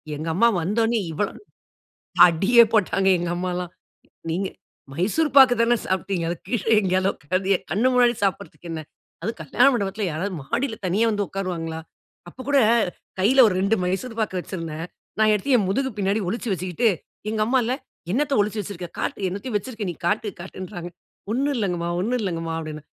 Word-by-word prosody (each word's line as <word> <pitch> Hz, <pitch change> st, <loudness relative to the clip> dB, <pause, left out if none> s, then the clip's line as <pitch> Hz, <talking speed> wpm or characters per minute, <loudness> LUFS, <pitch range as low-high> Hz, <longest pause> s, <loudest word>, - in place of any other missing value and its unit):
எங்க 155 Hz, +3 st, -5 dB
அம்மா 235 Hz, +6 st, +5 dB
வந்தோன்னே 225 Hz, +6 st, +1 dB
இவ்வளோ 195 Hz, +6 st, -1 dB, 1.0 s
அடியே 200 Hz, +8 st, +5 dB
போட்டாங்க 195 Hz, -2 st, +2 dB
எங்க 175 Hz, 0 st, -2 dB
அம்மாலாம், 180 Hz, 0 st, -3 dB, 0.6 s
நீங்க 185 Hz, +4 st, -1 dB, 0.5 s
மைசூர் 210 Hz, -, +1 dB
பாக்கு 260 Hz, -2 st, +9 dB
தானே 240 Hz, +1 st, +3 dB
சாப்பிட்டீங்க, 190 Hz, -2 st, -1 dB
அத 175 Hz, -, -1 dB
கீழே 225 Hz, -2 st, -1 dB
எங்கேயாகிலும் 185 Hz, 0 st, +1 dB
உக்காந்தி 185 Hz, +6 st, -1 dB
என் -, -, -24 dB
கண்ணு 220 Hz, +8 st, +2 dB
முன்னாடி 245 Hz, -1 st, +4 dB
சாப்பிடுறதுக்கு 190 Hz, -3 st, -3 dB
என்ன? 160 Hz, -1 st, -4 dB, 0.4 s
அதும் 225 Hz, -, -3 dB
கல்யாண 165 Hz, -, +3 dB
மண்டபத்தில 205 Hz, -2 st, -1 dB
யாராவது 185 Hz, +6 st, -3 dB
மாடியில 220 Hz, -, -2 dB
தனியா 200 Hz, +6 st, +2 dB
வந்து 205 Hz, -1 st, -1 dB
உக்காருவாங்களா? 170 Hz, -4 st, -4 dB, 0.5 s
அப்ப 210 Hz, -, -21 dB
கூட 285 Hz, -1 st, +5 dB, 0.6 s
கையில 255 Hz, +7 st, +6 dB
ஒரு 195 Hz, -, 0 dB
2 200 Hz, +4 st, +2 dB
மைசூர் 225 Hz, +6 st, -3 dB
பாக்கு 190 Hz, -4 st, -1 dB
வச்சிருந்தேன், 165 Hz, -3 st, -5 dB, 0.3 s
நான் 215 Hz, 0 st, +5 dB
எடுத்து 255 Hz, +6 st, +1 dB
என் 200 Hz, -5 st, 0 dB
முதுகு 265 Hz, +6 st, 0 dB
பின்னாடி 200 Hz, +2 st, +1 dB
ஒளிச்சு 230 Hz, +2 st, -3 dB
வச்சிகிட்டு, 185 Hz, +5 st, 0 dB, 0.4 s
எங்க 215 Hz, 0 st, -1 dB
அம்மால்ல, 245 Hz, 0 st, +1 dB, 0.4 s
"என்னத்த 280 Hz, +3 st, +1 dB
ஒழிச்சு 210 Hz, +1 st, -2 dB
வச்சிருக்க, 180 Hz, -3 st, -7 dB
காட்டு -, -, -3 dB
என்னத்தையோ 205 Hz, +5 st, -5 dB
வச்சிருக்க 220 Hz, 0 st, -6 dB
நீ -, -, -10 dB
காட்டு" 210 Hz, +3 st, 0 dB
காட்டுன்றாங்க. 180 Hz, -1 st, -7 dB, 0.4 s
"ஒண்ணும் 280 Hz, +4 st, +1 dB
இல்லங்கமா, 175 Hz, -5 st, -1 dB
ஒண்ணும் 245 Hz, +6 st, 0 dB
இல்லங்கமா" 165 Hz, -4 st, -3 dB
அப்படினு, 155 Hz, -2 st, -7 dB
195 Hz, 160 wpm, -23 LUFS, 180-230 Hz, 1.0 s, பாக்கு